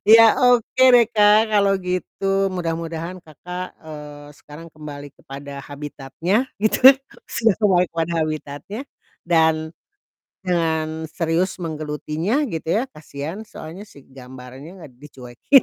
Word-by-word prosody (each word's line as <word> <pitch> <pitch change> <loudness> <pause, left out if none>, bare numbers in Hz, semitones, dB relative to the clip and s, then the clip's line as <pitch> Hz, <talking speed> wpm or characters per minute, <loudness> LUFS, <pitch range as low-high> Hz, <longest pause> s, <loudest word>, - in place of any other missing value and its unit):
Iya, 225 +1 +8 0.2
oke 255 +2 +1
deh, 235 -2 +5
Kak, 215 +1 +5
kalau 200 -1 +3
gitu, 195 +1 -1
mudah-mudahan 170 0 -4
Kakak, 180 +3 -8
eee, 150 -1 -10
sekarang 155 +3 -13
kembali 145 -2 -9
kepada 140 +1 -9
habitatnya, 145 - -3
gitu, 220 +5 +6 0.4
sudah 230 -2 +2
kembali 185 -4 +4
kepada 165 0 -2
habitatnya 155 - -6 0.5
dan 160 -2 +3 0.7
dengan 160 -3 -1
serius 165 +3 -1
menggelutinya, 155 - -2
gitu 160 -1 -5
ya, 205 +9 +1
kasihan 155 - -7
soalnya 185 +3 -10
si 140 - -16
gambarannya 130 +6 -11
gak 135 - -12
dicuekin. 135 - +2
165 Hz, 115 wpm, -21 LUFS, 150-195 Hz, 0.7 s, Iya